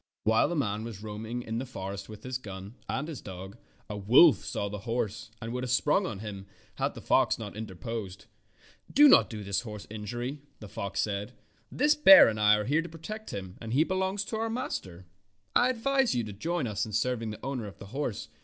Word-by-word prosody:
While 110 Hz, +1 st, +4 dB
the 175 Hz, -, -2 dB
man 110 Hz, -7 st, -1 dB
was 110 Hz, -3 st, -7 dB
roaming 110 Hz, +3 st, -5 dB
in 115 Hz, 0 st, -3 dB
the -, -, -3 dB
forest 100 Hz, -4 st, -6 dB
with 105 Hz, -1 st, -10 dB
his 130 Hz, 0 st, -3 dB
gun 100 Hz, -2 st, -8 dB, 0.2 s
and 145 Hz, +3 st, -2 dB
his 160 Hz, -5 st, -6 dB
dog, 95 Hz, +1 st, -8 dB, 0.3 s
a 105 Hz, -, -5 dB
wolf 120 Hz, -, +6 dB
saw 100 Hz, -, -3 dB
the 105 Hz, 0 st, -5 dB
horse 115 Hz, 0 st, -3 dB
and 115 Hz, 0 st, -5 dB
would 125 Hz, 0 st, -3 dB
have 125 Hz, -, -3 dB
sprung 150 Hz, +9 st, +2 dB
on 100 Hz, -, -5 dB
him 100 Hz, -3 st, -7 dB, 0.3 s
had -, -, 0 dB
not -, -, -2 dB
the -, -, -8 dB
fox -, -, +3 dB
interposed. 105 Hz, -1 st, -6 dB, 0.7 s
"Do 295 Hz, +2 st, +8 dB
this 105 Hz, -, +3 dB
horse 105 Hz, -3 st, -8 dB
no -, -, -6 dB
injury," 120 Hz, +7 st, -4 dB, 0.2 s
the 105 Hz, -, -9 dB
fox 100 Hz, 0 st, -3 dB
said. 100 Hz, -1 st, -3 dB, 0.4 s
"This 295 Hz, +2 st, +3 dB
bear 195 Hz, -11 st, +9 dB
and 110 Hz, -1 st, -1 dB
I 105 Hz, 0 st, +6 dB
are 105 Hz, 0 st, -1 dB
here 150 Hz, +5 st, +2 dB
to 170 Hz, -, -8 dB
protect 215 Hz, +7 st, -8 dB
him, 95 Hz, -2 st, -7 dB
and 115 Hz, 0 st, -5 dB
he 145 Hz, +5 st, +5 dB
belongs 190 Hz, +3 st, -1 dB
to 220 Hz, -, -4 dB
our 225 Hz, +1 st, -1 dB
master. 95 Hz, -, -4 dB, 0.5 s
I 245 Hz, -, +5 dB
advise 265 Hz, +1 st, +1 dB
you 120 Hz, -, +1 dB
to 105 Hz, -2 st, -6 dB
join 165 Hz, -, -2 dB
us 105 Hz, -3 st, -2 dB
in 110 Hz, -, -5 dB
serving 115 Hz, +1 st, 0 dB
the 105 Hz, +3 st, -8 dB
owner 130 Hz, -5 st, -3 dB
of 100 Hz, -, -11 dB
the -, -, -10 dB
horse. 115 Hz, -6 st, -3 dB
115 Hz, 215 wpm, -29 LUFS, 105-150 Hz, 0.7 s, bear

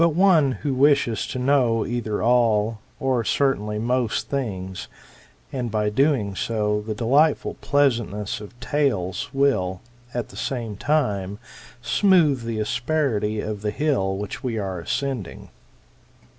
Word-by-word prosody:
one 165 Hz, -5 st, +4 dB
who 145 Hz, -3 st, 0 dB
wishes 140 Hz, -4 st, +3 dB
to -, -, -5 dB
know 125 Hz, -4 st, +2 dB
either 115 Hz, -3 st, -2 dB
all, 115 Hz, -2 st, +2 dB, 0.2 s
or 130 Hz, -3 st, +1 dB
certainly 105 Hz, -5 st, 0 dB
most 120 Hz, +1 st, -1 dB
things; 95 Hz, -9 st, -4 dB, 0.7 s
and, 125 Hz, -3 st, -2 dB
by 105 Hz, -1 st, 0 dB
so -, -, -8 dB
doing, 130 Hz, -4 st, +2 dB, 0.5 s
the 110 Hz, -, -2 dB
delightful 140 Hz, +7 st, +2 dB
pleasantness 115 Hz, -8 st, 0 dB
of 110 Hz, +3 st, -12 dB
tales 120 Hz, -10 st, -1 dB
will, 115 Hz, -10 st, +1 dB, 0.3 s
at 120 Hz, -1 st, -4 dB
the -, -, -14 dB
same 115 Hz, -5 st, -3 dB
time, 100 Hz, -8 st, 0 dB, 0.5 s
smooth 165 Hz, -, +3 dB
the 115 Hz, -1 st, -3 dB
asperity 110 Hz, -3 st, 0 dB
of 105 Hz, -2 st, -4 dB
the 105 Hz, -, -1 dB
hill 105 Hz, -6 st, 0 dB
which 100 Hz, 0 st, -5 dB
we 120 Hz, -3 st, -2 dB
are 95 Hz, -3 st, -3 dB
ascending. 125 Hz, -, -4 dB
120 Hz, 130 wpm, -23 LUFS, 105-140 Hz, 0.7 s, one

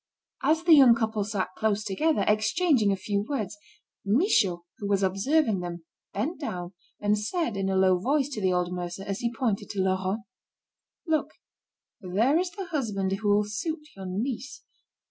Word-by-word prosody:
As 315 Hz, +4 st, +2 dB
the 340 Hz, -1 st, +6 dB
young 265 Hz, -6 st, +8 dB
couple 220 Hz, -2 st, -1 dB
sat 200 Hz, -2 st, -2 dB
close 215 Hz, -1 st, 0 dB
together, 260 Hz, +11 st, +1 dB
exchanging 220 Hz, -, +3 dB
a -, -, +2 dB
few 200 Hz, +1 st, -2 dB
words, 215 Hz, -8 st, -2 dB, 0.5 s
Michaud, 200 Hz, -, +2 dB, 0.2 s
who 205 Hz, -, -3 dB
was 200 Hz, -1 st, +1 dB
observing 210 Hz, +4 st, +2 dB
them, 175 Hz, -2 st, -6 dB, 0.3 s
bent 275 Hz, -, -3 dB
down, 180 Hz, -, -5 dB, 0.3 s
and 210 Hz, 0 st, +1 dB
said 235 Hz, -, -2 dB
in 195 Hz, 0 st, -1 dB
a 190 Hz, -, 0 dB
low 185 Hz, -1 st, +4 dB
voice 275 Hz, +6 st, +1 dB
to 230 Hz, -7 st, -5 dB
the 185 Hz, -1 st, +2 dB
old 180 Hz, 0 st, 0 dB
mercer, 180 Hz, +1 st, -5 dB
as 195 Hz, 0 st, -4 dB
he 235 Hz, -1 st, -1 dB
pointed 230 Hz, -4 st, -2 dB
to 200 Hz, -, -4 dB
Laurent: 190 Hz, +3 st, 0 dB, 0.8 s
"Look, 315 Hz, -3 st, 0 dB, 0.7 s
there 225 Hz, -, +2 dB
is 365 Hz, 0 st, -1 dB
the 390 Hz, +1 st, -7 dB
husband 220 Hz, -, -2 dB
who 205 Hz, +2 st, -1 dB
will 205 Hz, +1 st, +4 dB
suit 300 Hz, -, -4 dB
your 190 Hz, -1 st, -7 dB
niece. 250 Hz, +7 st, -4 dB
210 Hz, 170 wpm, -27 LUFS, 190-275 Hz, 0.8 s, young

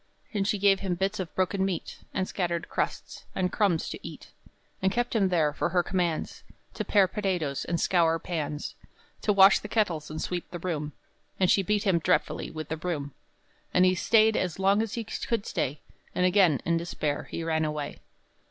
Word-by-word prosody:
And 200 Hz, -2 st, 0 dB
she 210 Hz, -, +1 dB
gave 195 Hz, -1 st, +4 dB
him 190 Hz, -3 st, -1 dB
bits 195 Hz, +3 st, -1 dB
of 185 Hz, -3 st, -5 dB
broken 190 Hz, +1 st, +1 dB
meat, 190 Hz, -4 st, -3 dB
And 190 Hz, -1 st, -1 dB
scattered 175 Hz, -2 st, -2 dB
crusts, -, -, -3 dB
and 185 Hz, -1 st, 0 dB
crumbs, 195 Hz, -7 st, +1 dB
to -, -, -6 dB
eat; -, -, -10 dB, 0.5 s
And 190 Hz, 0 st, +2 dB
kept 240 Hz, +2 st, -1 dB
him 195 Hz, -4 st, +3 dB
there 160 Hz, -5 st, +2 dB
for 170 Hz, -, -1 dB
her 175 Hz, 0 st, +2 dB
commands 175 Hz, -4 st, -2 dB, 0.3 s
To -, -, -3 dB
pare 200 Hz, -3 st, +4 dB
potatoes, 180 Hz, -9 st, -2 dB
and 170 Hz, -1 st, -1 dB
scour 165 Hz, -3 st, +3 dB
pans, 155 Hz, -3 st, -4 dB, 0.5 s
To 210 Hz, -, +2 dB
wash 195 Hz, 0 st, +7 dB
the -, -, -8 dB
kettles 190 Hz, -9 st, 0 dB
and 155 Hz, +1 st, -5 dB
sweep 175 Hz, +1 st, -3 dB
the 175 Hz, -, -5 dB
room; 155 Hz, -4 st, -3 dB, 0.5 s
And 185 Hz, -2 st, +4 dB
she 195 Hz, -, +4 dB
beat 205 Hz, +2 st, 0 dB
him 190 Hz, -5 st, +3 dB
dreadfully 180 Hz, +3 st, 0 dB
with 155 Hz, -2 st, -7 dB
the 160 Hz, -, -2 dB
broom; 155 Hz, -4 st, -3 dB, 0.6 s
And 180 Hz, -, +6 dB
he 185 Hz, -, +4 dB
staid 220 Hz, +4 st, +4 dB
as 180 Hz, -3 st, -1 dB
long 195 Hz, +2 st, +3 dB
as 225 Hz, -2 st, -3 dB
he 230 Hz, -, -2 dB
could 225 Hz, 0 st, -3 dB
stay, 145 Hz, +2 st, -2 dB, 0.3 s
And 180 Hz, -, +2 dB
again, 180 Hz, -7 st, +4 dB
in 170 Hz, 0 st, +2 dB
despair, 155 Hz, -3 st, -2 dB
he 165 Hz, -, -4 dB
ran 160 Hz, -1 st, 0 dB
away. 150 Hz, -2 st, -3 dB
180 Hz, 195 wpm, -28 LUFS, 160-195 Hz, 0.6 s, wash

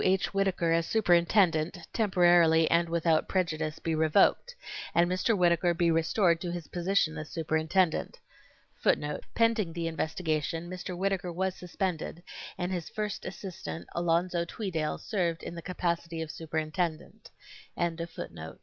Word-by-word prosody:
H. 190 Hz, +1 st, +1 dB
Whittaker 195 Hz, -4 st, +1 dB
as 165 Hz, 0 st, +2 dB
superintendent, 175 Hz, -4 st, +3 dB, 0.2 s
temporarily 175 Hz, -5 st, +4 dB
and 170 Hz, 0 st, +3 dB
without 165 Hz, -1 st, +2 dB
prejudice, 160 Hz, -4 st, -1 dB
be 165 Hz, -, -2 dB
revoked, 160 Hz, -, +3 dB, 0.4 s
and 170 Hz, 0 st, +5 dB
Mr. 185 Hz, +5 st, +1 dB
Whittaker 175 Hz, -1 st, +3 dB
be 170 Hz, -1 st, +2 dB
restored 165 Hz, +1 st, +2 dB
to 175 Hz, -, -3 dB
his 175 Hz, -3 st, -5 dB
position 175 Hz, -3 st, 0 dB
as 155 Hz, -, -7 dB
superintendent: 160 Hz, +2 st, 0 dB, 1.2 s
Pending 230 Hz, -7 st, +2 dB
the 170 Hz, -1 st, -3 dB
investigation 160 Hz, 0 st, -2 dB
Mr. 180 Hz, 0 st, -5 dB
Whittaker 190 Hz, -1 st, -1 dB
was 190 Hz, +2 st, -1 dB
suspended, 180 Hz, -2 st, -4 dB, 0.3 s
and 180 Hz, +1 st, -2 dB
his 175 Hz, -3 st, -3 dB
first 210 Hz, -2 st, -4 dB
assistant, 185 Hz, -3 st, -7 dB
Alonzo 170 Hz, +1 st, +1 dB
Tweedale, 170 Hz, -4 st, -3 dB
served 175 Hz, -7 st, -2 dB
in -, -, -6 dB
the 170 Hz, -, -7 dB
capacity 170 Hz, -1 st, -2 dB
of 155 Hz, -, -7 dB
superintendent. 160 Hz, +1 st, -3 dB
170 Hz, 125 wpm, -29 LUFS, 165-185 Hz, 1.2 s, and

